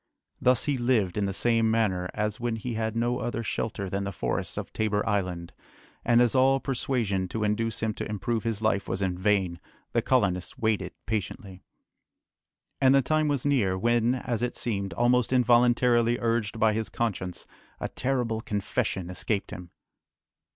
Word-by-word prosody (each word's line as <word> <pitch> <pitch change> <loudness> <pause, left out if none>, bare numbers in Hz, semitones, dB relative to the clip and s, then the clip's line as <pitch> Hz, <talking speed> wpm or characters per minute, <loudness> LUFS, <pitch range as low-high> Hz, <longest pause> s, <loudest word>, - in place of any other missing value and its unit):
Thus 125 -2 +3
he 145 -3 -1
lived 115 -7 +1
in 105 - 0
the - - -1
same 115 +3 +2
manner 95 -5 +1
as 105 0 -1
when 120 -1 -1
he 115 +2 -4
had 110 0 -2
no 120 +1 0
other 115 -1 -3
shelter 105 -2 -3
than 100 +2 -2
the 100 - -3
forests - - -3
of - - -5
Tabor 105 0 0
Island, 90 -5 -2 0.5
and 120 +1 +5
as 120 - +1
all 135 +1 +4
persuasion 120 -8 -1
to 110 +3 -3
induce 110 +1 -1
him 110 -1 0
to - - -5
improve 110 +2 -1
his 115 -2 -2
life 100 -2 +1
was 100 - -1
in 90 -2 0
vain, 95 -2 +1 0.3
the - - +3
colonists 90 0 0
waited 110 -2 0
patiently. 100 -3 -4 1.2
And 135 0 +6
the 135 - +4
time 155 +3 +1
was 145 -3 0
near, 110 -10 +2
when, 120 +4 +2
as 120 -3 -3
it 125 0 -2
seemed, 100 -4 -2
almost 120 0 +2
involuntarily 120 -1 +4
urged 115 -2 0
by 110 -1 +4
his 110 0 -2
conscience, 95 -6 -3 0.3
a - - -2
terrible 125 -4 -1
confession 100 -5 -2
escaped 95 +3 -2
him. 90 -1 -8
110 Hz, 170 wpm, -27 LUFS, 100-120 Hz, 1.2 s, And